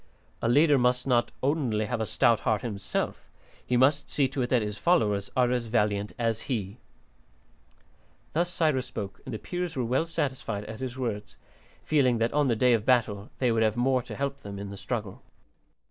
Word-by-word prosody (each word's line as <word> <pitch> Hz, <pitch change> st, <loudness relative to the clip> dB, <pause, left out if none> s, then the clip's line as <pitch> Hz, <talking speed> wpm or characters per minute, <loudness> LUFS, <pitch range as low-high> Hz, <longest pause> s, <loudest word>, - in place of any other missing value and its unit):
A 115 Hz, -, +1 dB
leader 145 Hz, +2 st, +5 dB
must 125 Hz, 0 st, +2 dB
not 120 Hz, -3 st, +2 dB
only 130 Hz, -7 st, +1 dB
have 120 Hz, 0 st, -2 dB
a 110 Hz, -, -1 dB
stout 115 Hz, +1 st, +3 dB
heart 110 Hz, -1 st, 0 dB
himself; 100 Hz, -5 st, -3 dB, 0.3 s
he 125 Hz, -, 0 dB
must 140 Hz, +3 st, +3 dB
see 140 Hz, -2 st, +2 dB
to 135 Hz, -, -3 dB
it 120 Hz, -, -1 dB
that 125 Hz, -4 st, +3 dB
his 105 Hz, 0 st, -4 dB
followers 105 Hz, -, +2 dB
are 125 Hz, -1 st, +3 dB
as 125 Hz, -2 st, 0 dB
valiant 105 Hz, -3 st, 0 dB
as 115 Hz, -2 st, 0 dB
he." 105 Hz, -4 st, -2 dB, 1.6 s
Thus 175 Hz, +2 st, +1 dB
Cyrus 155 Hz, -7 st, +1 dB
spoke, 100 Hz, -3 st, -6 dB
and 130 Hz, -, -6 dB
the 110 Hz, -, -3 dB
Peers 175 Hz, +5 st, -4 dB
were 125 Hz, -, -1 dB
well 130 Hz, +8 st, +1 dB
satisfied 130 Hz, -9 st, -3 dB
at 110 Hz, +1 st, -8 dB
his 130 Hz, -1 st, -5 dB
words, 105 Hz, -5 st, -4 dB, 0.5 s
feeling 130 Hz, -6 st, +3 dB
that 115 Hz, +1 st, 0 dB
on 145 Hz, -1 st, +3 dB
the 120 Hz, -, +2 dB
day 125 Hz, +2 st, +4 dB
of 110 Hz, -3 st, +1 dB
battle 110 Hz, -4 st, +1 dB
they 125 Hz, -2 st, +2 dB
would 115 Hz, 0 st, +1 dB
have 110 Hz, 0 st, +2 dB
more 130 Hz, +1 st, +2 dB
to -, -, -8 dB
help 140 Hz, 0 st, -3 dB
them 100 Hz, -5 st, -8 dB
in 100 Hz, 0 st, -6 dB
the -, -, -7 dB
struggle. 105 Hz, -1 st, -4 dB
120 Hz, 195 wpm, -28 LUFS, 110-130 Hz, 1.6 s, leader